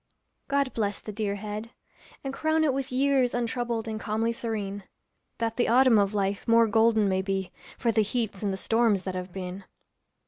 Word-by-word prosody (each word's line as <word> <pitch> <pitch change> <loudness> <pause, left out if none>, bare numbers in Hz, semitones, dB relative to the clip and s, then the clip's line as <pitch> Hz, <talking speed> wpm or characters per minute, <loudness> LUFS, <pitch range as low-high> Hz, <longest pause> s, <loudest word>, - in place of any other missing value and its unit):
God 280 -2 +1
bless 205 -3 -1
the 215 - -7
dear 205 -1 -2
head! 210 +2 -5 0.5
and 270 -1 -4
crown 315 +2 +1
it 290 -4 +2
with 270 0 -3
years 260 -1 +2
Untroubled 235 -1 -2
and 220 -1 -3
calmly 220 +1 0
serene; 205 -4 -4 0.5
That 225 -1 -2
the 245 - +2
autumn 245 -2 +5
of 200 +1 +1
life 200 0 -1
more 230 0 +6
golden 220 -1 +3
may 190 -1 +1
be 190 -1 -2 0.3
For 235 - +1
the 220 - +3
heats 215 -2 -2
and 205 -2 0
the 190 - -3
storms 225 -2 +2
that 190 - -4
have 185 0 -5
been. 185 +1 -6
220 Hz, 185 wpm, -27 LUFS, 200-240 Hz, 0.5 s, more